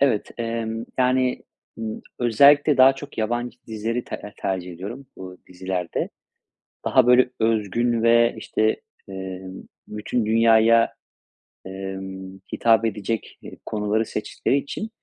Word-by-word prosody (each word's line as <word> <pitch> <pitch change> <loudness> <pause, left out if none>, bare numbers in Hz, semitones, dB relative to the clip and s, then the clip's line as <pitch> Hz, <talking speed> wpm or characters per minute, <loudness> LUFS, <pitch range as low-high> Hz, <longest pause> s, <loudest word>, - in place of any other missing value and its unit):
Evet, 130 -7 +2
emm, 115 0 -3
yani, 130 0 +2 0.4
ımm, 110 -1 -5 0.2
özellikle 140 +5 +5
daha 130 +1 +7
çok 145 -1 -10
yabancı 120 +2 -2
dizileri 115 +2 -3
ter - - -6
eee, 105 - -9
tercih 90 -2 -3
ediyorum 105 +11 -8
bu 90 -1 -9
dizilerde. 90 -1 -3 0.8
Daha, - - +4
böyle, 125 +1 +6
özgün 115 +1 +1
ve, 115 0 +4
işte, 110 0 0 0.3
emm, 95 0 -7 0.2
bütün 105 +2 -2
dünyaya, 115 +1 +4 0.7
emm, 95 0 -7
hitap 115 -1 +3
edecek, 110 +1 -3
eee, - - -11
konuları 105 +1 0
seçtikleri 110 +5 -1
için 140 +10 -4
110 Hz, 120 wpm, -23 LUFS, 95-120 Hz, 0.8 s, daha